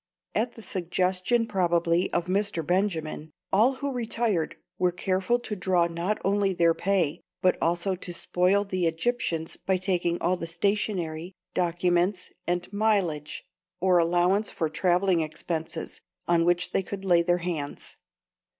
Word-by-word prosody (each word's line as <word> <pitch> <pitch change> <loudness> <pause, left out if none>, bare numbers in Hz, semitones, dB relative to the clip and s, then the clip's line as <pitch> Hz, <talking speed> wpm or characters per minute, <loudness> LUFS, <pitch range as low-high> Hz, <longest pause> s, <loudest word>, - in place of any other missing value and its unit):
At 235 +2 0
the 225 - -11
suggestion 185 +5 0
probably 175 -3 +1
of 170 - 0
Mr. 190 -3 0
Benjamin, 165 -4 -1 0.2
all 225 +7 +5
who 280 +1 -3
retired 225 -7 0 0.2
were 180 -1 +3
careful 190 +5 0
to 240 -3 -5
draw 180 -2 +2
not 170 +5 -1
only 200 0 +2
their 170 -1 +4
pay, 180 -5 0 0.2
but 185 - +4
also 175 +3 +1
to 180 -1 -6
spoil 180 +3 +1
the 185 -3 -1
Egyptians 165 -2 -1
by 190 -1 0
taking 175 -2 0
all 180 +1 +1
the 165 - -5
stationery, 180 -2 -1 0.2
documents, 175 +1 +1 0.2
and 175 +2 -2
"mileage," 195 -9 0 0.4
or 180 -1 +4
allowance 175 +5 +2
for 160 -4 -2
travelling 180 +1 +2
expenses, 160 +1 -4 0.3
on 170 -1 +3
which 175 +1 +2
they - - +2
could 195 +1 -7
lay 175 -2 +5
their 175 +1 +2
hands. 165 -5 -5
180 Hz, 140 wpm, -27 LUFS, 170-195 Hz, 0.4 s, all